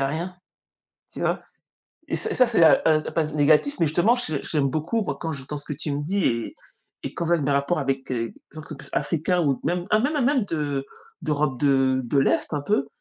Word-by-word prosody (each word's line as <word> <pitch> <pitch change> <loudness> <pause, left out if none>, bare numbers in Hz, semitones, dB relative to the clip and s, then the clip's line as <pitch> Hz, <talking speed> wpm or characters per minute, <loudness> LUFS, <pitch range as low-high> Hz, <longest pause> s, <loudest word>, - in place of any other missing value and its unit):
a 135 - +1
rien, 170 +5 -5 0.8
tu - - -7
vois - - -1 0.7
et - - -1
ça, 435 -13 +6
c'est, 225 -8 +5
heu - - +5
heu, 155 -1 +2
pas 165 - +1
négatif 150 - +3
mais, 165 - +3
justement, 175 +10 +3
je 160 - +4
j'aime 145 -4 0
beaucoup, 170 - -2
moi, - - -4
quand 165 - -3
j'entends 140 +1 -4
ce 145 - +1
que 150 - -4
tu 150 0 +2
me 145 - -3
dis 190 +4 0
et 115 -1 -1 0.5
et - - -5
quand 170 - -2
je 170 - +2
vois 165 - 0
mes 145 - -1
rapports 140 +5 0
avec 135 -1 -3
des 115 -3 -4 0.2
gens 155 +1 -9
qui - - -8
sont 150 - -6
plus 135 - -2
africains 175 +2 0
ou 135 -2 0
même 175 +2 -2
hein, 215 - +4
même, 290 +7 -1
hein, 290 - 0
même 260 -2 +1
de 145 -5 -3 0.4
d'Europe 150 -3 -1
de 135 -2 +2
de 140 +4 -1
l'Est, 135 - +1
un 145 - -3
peu, 205 -7 0
155 Hz, 235 wpm, -23 LUFS, 140-175 Hz, 0.8 s, ça